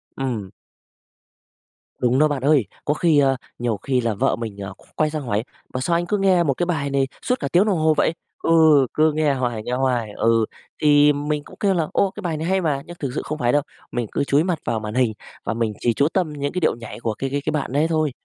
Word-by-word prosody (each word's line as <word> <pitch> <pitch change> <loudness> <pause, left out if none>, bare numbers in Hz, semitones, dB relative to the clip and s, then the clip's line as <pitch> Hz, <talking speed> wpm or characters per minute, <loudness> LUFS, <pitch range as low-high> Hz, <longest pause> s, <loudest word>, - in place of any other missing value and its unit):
Ừm. 120 -8 -3 1.5
Đúng 125 +2 +2
đó 155 - +5
bạn 145 -3 -2
ơi, 140 -6 +4 0.2
có 145 - +2
khi, 155 -2 +3
ờ 135 -1 +3 0.2
nhiều 120 -4 -1
khi 130 +4 0
là 115 -2 0
vợ 100 - +1
mình, 110 -4 -6
ờ, 95 -1 -6
qu - - -21
quay 155 -1 +2
sang 155 -1 -3
hỏi: 110 -2 -1 0.3
"Ủa, 130 - -2
sao 170 +6 +1
anh 175 +1 0
cứ 205 +3 0
nghe 190 -3 +3
một 140 -4 +1
cái 175 - -1
bài 150 -5 -1
này 135 -1 +1
suốt 250 0 0
cả - - -2
tiếng 180 +4 +4
đồng 195 -5 +1
hồ 155 0 +3
vậy? 160 - +2 0.3
Ừ, - - +1 0.4
cứ 155 0 +3
nghe 150 -2 +2
hoài, 120 -4 -2
nghe 125 - -5
hoài." 125 -4 0
Ừ, 115 -1 +3 0.4
thì 145 0 +6
mình 145 +1 -2
cũng - - -14
kêu 200 -2 +2
là 165 -4 0
"Ồ, 195 -1 +2
cái 210 - -9
bài 165 -4 -2
này 160 - -3
hay 190 0 +2
mà!" 145 -4 0
Nhưng 175 - -9
thực 140 -4 -3
sự - - -1
không 155 - -4
phải 120 -3 +1
đâu, 145 - +3 0.3
mình 120 -3 -2
cứ 140 - 0
chúi 140 +3 +2
mặt 175 -3 -1
vào 115 - 0
màn 105 0 -5
hình 125 -4 +2 0.3
và - - -2
mình 115 -2 -1
chỉ 120 - +1
chú 140 +5 +2
tâm 175 -6 0
những 145 0 -3
cái 180 - -1
điệu - - +2
nhảy 115 0 -9
của 115 -2 -2
cái 135 +4 -4
cái 145 +2 -2
bạn 145 -4 -2
đấy 150 +3 +3
thôi. 155 -3 +1
145 Hz, 260 wpm, -22 LUFS, 120-155 Hz, 1.5 s, thì